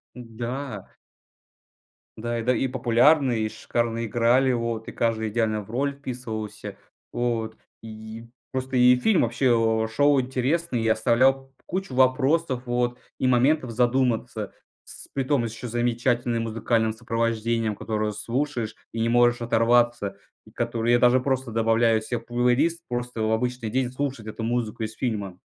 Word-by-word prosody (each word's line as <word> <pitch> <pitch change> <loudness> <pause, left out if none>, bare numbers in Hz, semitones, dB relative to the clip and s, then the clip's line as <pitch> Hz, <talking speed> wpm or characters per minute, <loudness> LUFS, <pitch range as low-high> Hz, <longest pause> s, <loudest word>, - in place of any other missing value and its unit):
Да. 120 -1 -6 1.3
Да 120 +1 -3
и, - - -2
да, 125 +2 +2
и 135 - 0
популярные, 125 0 +3
и - - -2
шикарно 115 +1 -2
играли. 120 +4 +3
Вот. 115 -2 -3
И - - -6
каждый 110 -1 0
идеально 110 -1 0
в 100 - -15
роль 140 +4 0
вписывался. 110 -6 -6 0.4
Вот. 115 -2 -2 0.3
И 110 +1 -9 0.3
просто 130 0 -3
и 125 0 +6
фильм 190 - +2
вообще, 135 - 0 0.4
э, - - -3
шел 140 +5 +3
интересный, 130 +2 -1
и 115 - +1
оставлял 130 +4 +2
кучу 185 -7 -4
вопросов, 130 +1 +2
вот, 120 0 -1 0.2
и - - 0
моментов 130 +2 +3
задуматься. 125 0 0 0.3
С - - -12
притом 135 -2 +1
с 115 - -6
еще 125 +2 -7
замечательным 120 0 0
музыкальным 115 0 0
сопровождением, 115 -1 -1
которое 110 0 -2
слушаешь 120 0 -3 0.2
и 115 - -4
не 115 - +1
можешь 120 0 +3
оторваться. 120 -2 +2 0.3
И - - -17
которое 120 0 -1
я - - +5
даже 125 +1 +4
просто 130 -1 -1
добавляю 115 0 +2
себе 120 +2 -3
в 115 - -17
плейлист, 125 +8 +1
просто 120 -2 -3
в 110 - +1
обычный 125 0 -1
день 125 +1 0
слушать 130 -4 -4
эту 110 +1 -6
музыку 115 0 -2
из 110 0 -3
фильма. 100 -7 -3
120 Hz, 150 wpm, -25 LUFS, 115-130 Hz, 1.3 s, и